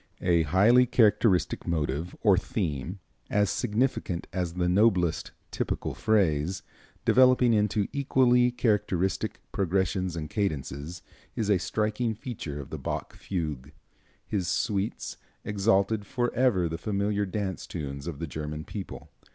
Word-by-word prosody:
A 85 -2 +4
highly 105 +11 +5
characteristic 110 - +3
motive, 80 0 -2
or 100 -4 +5
theme, 90 - -3 0.3
as 105 -2 +2
significant 110 -6 -1
as 90 -2 -2
the 90 -1 0
noblest 90 -3 +2 0.2
"typical - - -2
phrase," 95 -4 +1 0.4
developing 125 -2 +5
into 105 -1 +1
equally 125 -3 +3
characteristic 100 -6 0
progressions 95 -1 0
and 80 -2 -4
cadences, 80 -4 -3 0.3
is 105 -2 0
a 95 - +4
striking 110 +4 -1
feature 100 - -6
of 70 - -9
the - - -5
Bach - - -4
fugue. 75 -7 -4 0.5
His 95 -5 -2
"Suites" 100 +2 -1 0.3
exalted 100 0 +1
forever 120 -6 +1
the 80 0 -4
familiar 100 +1 -1
dance 95 -1 -3
tunes 70 -3 -5
of 85 -5 -4
the 85 - -4
German 75 0 -5
people. 100 +3 -8
95 Hz, 125 wpm, -27 LUFS, 85-110 Hz, 0.5 s, highly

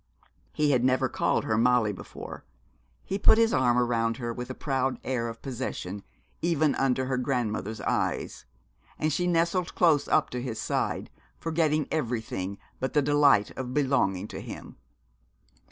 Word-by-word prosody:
He 150 -1 +1
had 125 -3 +2
never 130 0 +3
called - - 0
her 110 0 +1
Molly 120 -3 +3
before. 80 -4 -9 0.6
He 195 - -2
put 220 - +6
his 230 0 +3
arm 120 -2 +3
round 115 -2 +1
her 120 -2 -3
with 125 +1 -6
a 130 - -5
proud 135 -2 -1
air 125 -3 -1
of 115 0 -10
possession, 105 -6 -4 0.4
even 160 -3 +2
under 130 -1 +1
her 130 0 -1
grandmother's 110 -5 -2
eyes. - - -2 0.5
And 155 -1 0
she 180 +3 0
nestled 170 +1 +1
close 155 -5 +4
up - - +2
to 125 - -3
his 115 -3 -4
side, - - -2 0.3
forgetting 155 -2 0
everything 110 -9 -2 0.2
but 130 - -2
the 150 -1 +3
delight 140 -7 +4
of 130 -1 -5
belonging 130 -9 +1
to - - -6
him. - - -9
130 Hz, 155 wpm, -27 LUFS, 115-150 Hz, 0.6 s, put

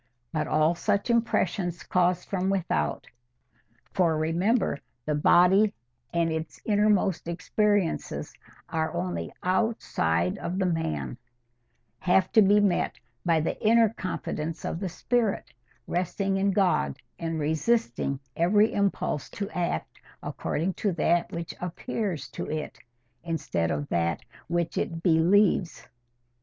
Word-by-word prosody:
But 155 - -1
all 155 +2 +3
such 205 +5 0
impressions 215 -6 0
caused 180 -1 +1
from 190 -1 -1
without—for, 120 - -3
remember, 170 - +1 0.3
the 150 - 0
body 180 +7 +5 0.4
and 170 -1 +1
its 160 -1 -4
innermost 205 -4 +2
experiences 200 +1 0 0.4
are 160 0 -1
only 85 -3 -3
OUTSIDE 90 - 0
OF 180 +2 -3
THE 190 - +1
MAN—have 120 - -3
to 225 - +6
be 205 +1 +5
met 200 -4 +1 0.3
by 165 -2 +3
the 155 - -3
inner 225 0 +5
confidence 165 -5 -4
of 165 - -3
the 190 -1 -3
spirit, 225 +3 -1 0.3
resting 195 +2 -1
in 195 +1 +2
God 180 - +2 0.2
and 165 -1 -2
resisting 150 - 0 0.2
every 205 +6 +3
impulse 200 -7 -1
to 205 +1 -5
act 170 - -3 0.2
according 175 +5 -2
to 200 -3 +1
that 170 0 +1
which 170 0 -5
APPEARS 180 - -3
TO - - -6
IT 155 -1 -4 0.4
instead 160 - -1
of 75 -1 -2
that 85 -1 0 0.3
which 170 0 -1
IT 165 0 -3
BELIEVES. 175 +2 +3
170 Hz, 120 wpm, -27 LUFS, 150-200 Hz, 0.4 s, to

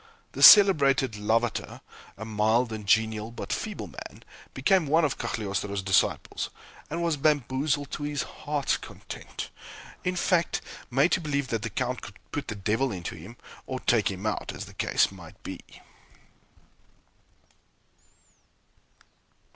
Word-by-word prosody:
The - - -6
celebrated 140 - +8
Lavater, 110 +2 -1 0.4
a 110 - -6
mild 110 +2 +1
and 105 -2 -7
genial, 110 +1 +2
but 115 - -5
feeble - - -4
man, - - -10 0.3
became 160 +5 +3
one 160 +3 +4
of 145 - -2
Cagliostro's 100 -3 -3
disciples, 95 -1 +1 0.4
and 170 +2 -2
was 165 -3 +1
bamboozled 145 0 +1
to - - -5
his 145 -1 -2
heart's 145 -2 -2
content - - -8 0.5
in 180 0 -1
fact, 175 -1 +1 0.3
made 135 +7 +3
to - - +2
believe 140 -4 -2
that 115 -2 -1
the 115 - -3
Count 125 +3 -2
could 100 - -10
put 145 -1 -4
the 105 - -4
devil 110 +6 0
into 90 -3 -5
him, 95 +9 -11 0.3
or 130 - -3
take 115 -6 +2
him 95 +1 -6
out, 110 - -2
as - - -6
the - - -13
case - - +2
might - - -13
be. - - -6
125 Hz, 140 wpm, -27 LUFS, 110-145 Hz, 0.5 s, celebrated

